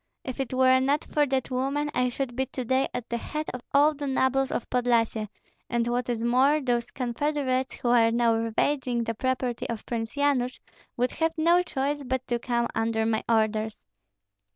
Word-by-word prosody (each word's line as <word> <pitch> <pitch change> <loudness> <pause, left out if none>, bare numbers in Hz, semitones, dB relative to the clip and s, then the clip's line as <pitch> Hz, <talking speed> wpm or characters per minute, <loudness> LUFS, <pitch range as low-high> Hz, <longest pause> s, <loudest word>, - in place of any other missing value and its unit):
If 255 +1 -6
it 270 - -2
were 260 0 +4
not 280 +3 +1
for 295 -1 +2
that 265 -1 -1
woman, 275 +4 -1
I 250 0 +1
should 245 -1 -4
be 265 +1 -1
to 255 0 -5
day 260 +3 +2
at 245 -1 -5
the 235 - -2
head 305 +4 -4
of 250 - -5
all 290 +2 +5
the 290 -1 -5
nobles 265 0 +1
of - - -3
Podlyasye; 230 -3 +1 0.4
and 235 -1 0
what 245 +1 -1
is 230 -1 -1
more, 260 +5 +4
those 240 -3 -1
confederates 260 +1 -1
who 240 - -2
are 235 -2 +5
now 235 0 +2
ravaging 240 +2 0
the 230 0 -2
property 250 0 -2
of 230 -2 -5
Prince 225 0 -4
Yanush 280 -3 +1 0.4
would 250 +1 +1
have 325 0 -1
no 340 +3 +4
choice 290 -3 -2
but 260 0 -2
to 240 -1 0
come 235 0 0
under 225 0 0
my 220 -1 0
orders. 220 -1 0
250 Hz, 190 wpm, -27 LUFS, 235-270 Hz, 0.4 s, all